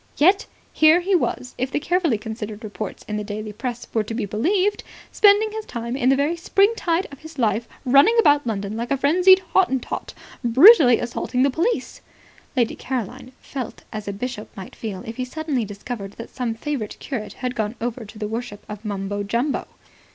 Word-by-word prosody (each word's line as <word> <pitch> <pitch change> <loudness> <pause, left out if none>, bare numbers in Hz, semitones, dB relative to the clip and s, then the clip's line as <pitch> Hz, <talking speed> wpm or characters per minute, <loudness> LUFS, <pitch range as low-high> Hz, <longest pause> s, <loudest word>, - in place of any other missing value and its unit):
Yet, 370 +7 +4 0.3
here 315 +2 +6
he 385 +3 0
was, 255 -7 0
if 255 +1 0
the 280 - -1
carefully 330 -5 +1
considered 215 0 -7
reports 215 -1 -6
in 210 - -3
the 210 - -3
daily 210 +1 -6
press 245 +2 -5
were 225 - +2
to 225 - -5
be 230 -3 -1
believed, 365 - 0 0.3
spending 420 +1 +5
his 440 0 -5
time 235 +1 -4
in 255 -1 +2
the 270 - +5
very 290 +5 +1
spring 395 +5 +3
tide 345 -2 0
of 280 - -11
his 315 -1 -12
life 225 -1 +1 0.2
running 280 - +6
about 290 - +4
London 205 -1 -3
like 235 +2 -4
a 275 - +1
frenzied 365 +7 +5
Hottentot, 265 -10 0 0.3
brutally 255 - +8
assaulting 250 +1 -1
the 275 - +3
police. 365 - -1 0.6
Lady 240 -3 +2
Caroline 255 0 -5
felt 260 -5 -6
as 215 -1 -6
a - - -1
bishop 215 +2 -5
might 190 - -9
feel 200 -5 -6
if 225 0 -7
he 255 - -1
suddenly 275 -2 -2
discovered 205 0 -7
that 230 - -10
some 245 -3 -3
favourite 240 -3 -4
curate 220 -7 -5
had 250 -1 -4
gone 215 0 -2
over 240 +1 -3
to 215 +1 -12
the 210 -1 -3
worship 225 -2 -6
of 210 0 -8
Mumbo 205 -1 -3
Jumbo. 235 +8 -1
245 Hz, 190 wpm, -22 LUFS, 215-310 Hz, 0.6 s, brutally